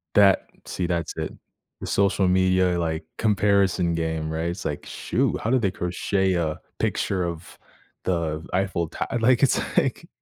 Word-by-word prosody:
That 100 -2 +5 0.2
see, 90 -2 -3
that's 85 -2 -2
it. - - -3 0.5
The - - -6
social 100 -1 +2
media, 95 -1 +3
like, 80 -1 -2
comparison 100 -5 +2
game, 80 -1 -2
right, 80 +2 -2
it's 90 +2 -6
like, 75 - -3
"Shoot, - - -1
how 110 - -1
did 130 -1 +3
they 100 -3 +1
crochet 95 +2 0
a 80 -3 -1 0.2
picture 95 -2 0
of 85 -1 -6 0.5
the 80 -2 -1
Eiffel 95 -3 0
to - - -4
“like, 125 +2 +4
it's 140 - +4 0.2
like - - +1
90 Hz, 160 wpm, -24 LUFS, 85-95 Hz, 0.5 s, That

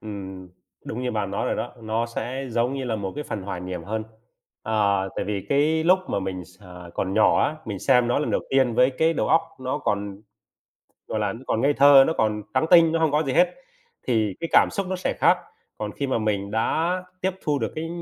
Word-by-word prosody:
Ừm, 95 -3 -8 0.4
đúng 125 +3 -5
như 125 - -1
bạn 105 -3 -2
nói 100 - -2
rồi - - -1
đó, 120 - -4
nó 110 +2 -1
sẽ 130 +3 -5
giống 120 +3 0
như 135 -1 -4
là 115 -3 -2
một 95 -2 -4
cái 150 - -5
phần 100 - -5
hoài 95 -2 -5
niệm 90 -2 -6
hơn. 110 +1 -3 0.6
À, 100 -3 +1
tại - - -1
vì 100 -2 -4
cái 155 +3 +2
lúc 185 +2 +5
mà - - -1
mình 95 -2 -5
x 90 +4 -20
à, 90 -2 -11
còn 95 0 -2
nhỏ 110 - +4
á, 155 - -2
mình 100 -3 -5
xem 125 0 +3
nó 120 - +2
lần 150 - -1
đầu - - +1
tiên 130 -3 +2
với 125 +2 +4
cái 160 +5 +1
đầu - - -1
óc 165 - +4 0.2
nó 130 0 -2
còn, 100 0 -3 0.8
gọi 110 - -3
là, 105 -2 0
nó 115 - -9
còn 110 - 0
ngây 140 +3 +3
thơ, 140 -1 +7
nó 160 - +1
còn 105 -1 +1
trắng 160 - +2
tinh, 165 -2 +7
nó 165 - +1
hông 160 -2 +2
có 150 - +3
gì 135 -4 -2
hết, 175 +2 +3 0.5
thì 110 -6 +1
cái 165 - -3
cảm - - +6
xúc 200 -2 -2
nó 185 - -2
sẽ 180 - -2
khác. - - +4 0.4
Còn 105 -1 -4
khi 140 - -3
mà 130 - 0
mình 100 -2 -1
đã 155 +10 0 0.3
tiếp 190 - +1
thu 145 -2 0
được - - -3
cái 160 +1 -4
115 Hz, 245 wpm, -24 LUFS, 100-145 Hz, 0.8 s, thơ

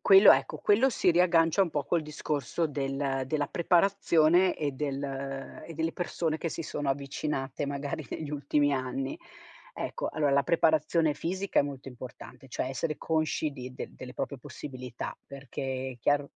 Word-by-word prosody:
Quello 195 +1 +9
ecco, - - 0
quello 220 +6 +4
si 185 - +3
riaggancia 170 0 +4
un 175 - -1
po' 145 -2 -1
col 170 +2 +1
discorso 150 +1 -2
del 135 -1 -1
della 145 +1 0
preparazione 175 0 +3
e 145 -2 -1
del 140 0 -3 0.6
e 165 - -8
delle 165 +1 -1
persone 165 -2 -2
che 165 - -2
si 165 - -4
sono 145 -1 -3
avvicinate, 140 0 -2
magari, 140 +1 -3
negli 155 -2 -4
ultimi 145 0 +1
anni. 130 0 -2 0.6
Ecco, - - -3
allora 145 -2 +1
la 140 0 +4
preparazione 160 0 +3
fisica 185 +6 0
è - - +3
molto 140 -1 -6
importante, 125 +1 -10
cioè 125 - -2
essere 155 +4 -2
consci 155 -1 0
di 130 -2 -7
del - - -6
delle 125 -1 -9
proprie 140 - -3
possibilità, 125 -1 -7
perché 135 -1 -4
è 120 - -20
chiaro 145 +4 +2
145 Hz, 160 wpm, -29 LUFS, 135-165 Hz, 0.6 s, Quello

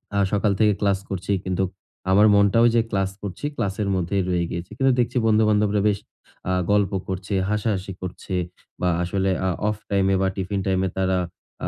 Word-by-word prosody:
আ - - +2
সকাল 105 0 +2
থেকে 105 -1 +4
ক্লাস 100 -1 +2
করছি। 95 +1 -2
কিন্তুক 95 0 0 0.4
আমার 105 +3 +6
মনটাও 100 +3 +4
ওইযে 120 0 +4
ক্লাস 95 -1 0
করছি 100 +6 -6
ক্লাসের 100 +1 -1
মধ্যেই 95 +2 0
রয়ে 90 -1 +1
গিয়েছে। 85 +1 -5
কিন্তু 135 0 +3
দেখছি 120 +1 +1
বন্ধু-বান্ধবরা 105 -1 +3
বেশ 100 - 0 0.5
আ - - +2 0.2
গল্প 105 -2 +3 0.2
করছে, 95 +2 -4 0.2
হাসাহাসি 100 -3 -1
করছে 95 +1 -5 0.5
বা 90 - +2
আসলে 95 +2 0 0.2
আ - - +2 0.2
অফ 105 - -1
টাইমে 95 -1 +2
বা 95 - +2
টিফিন 95 +1 -2
টাইমে 95 0 +1
তারা 95 0 +1 0.5
আ - - 0
100 Hz, 175 wpm, -23 LUFS, 95-105 Hz, 0.5 s, আমার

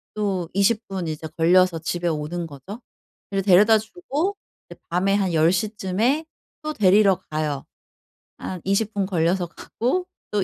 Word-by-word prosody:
또 195 -5 -1
20 215 +3 +2
분 190 -3 -4
이제 155 0 -5
걸려서 175 +1 +4
집에 175 +2 -2
오는 160 +2 -3
거죠. 155 - -10 0.5
그래서 195 -1 0
데려다 205 +4 +7
주고 330 - -3 0.3
이제 - - -12
밤에 190 +3 +2
한 195 -3 0
10 160 +1 +4
시쯤에 215 - 0 0.4
또 305 0 -3
데리러 195 -3 +4
가요. 150 -3 -2 0.7
한 185 -2 -6
20 200 +3 0
분 200 -1 0
걸려서 175 0 +1
가고 255 - -2 0.3
또 205 -2 +1
190 Hz, 245 characters per minute, -23 LUFS, 170-215 Hz, 0.7 s, 데려다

